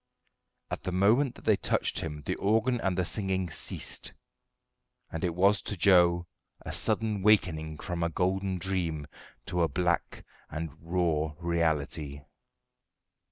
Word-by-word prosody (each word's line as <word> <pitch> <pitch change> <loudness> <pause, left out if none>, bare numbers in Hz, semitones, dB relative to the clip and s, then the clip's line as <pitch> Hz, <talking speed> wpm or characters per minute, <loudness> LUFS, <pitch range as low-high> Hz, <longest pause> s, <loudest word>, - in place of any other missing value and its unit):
At - - -3
the 90 - -3
moment 110 +9 +3
that - - -15
they - - +4
touched - - 0
him 75 -2 -5
the - - 0
organ 115 +4 +2
and 95 -1 0
the 90 - +1
singing 95 -3 -1
ceased; - - -2 1.0
and 80 - -4
it 85 -2 0
was 100 +2 +4
to 105 - -3
Joe 85 -2 +5 0.4
a - - -6
sudden 110 -3 0
wakening 80 -7 +2
from 85 +1 -4
a 85 - +1
golden 95 +2 0
dream 85 -5 -1 0.4
to 90 - -1
a 85 - +4
black 85 0 -1 0.2
and 80 0 -4
raw 80 -3 0
reality. 80 -4 -1
90 Hz, 140 wpm, -29 LUFS, 80-95 Hz, 1.0 s, Joe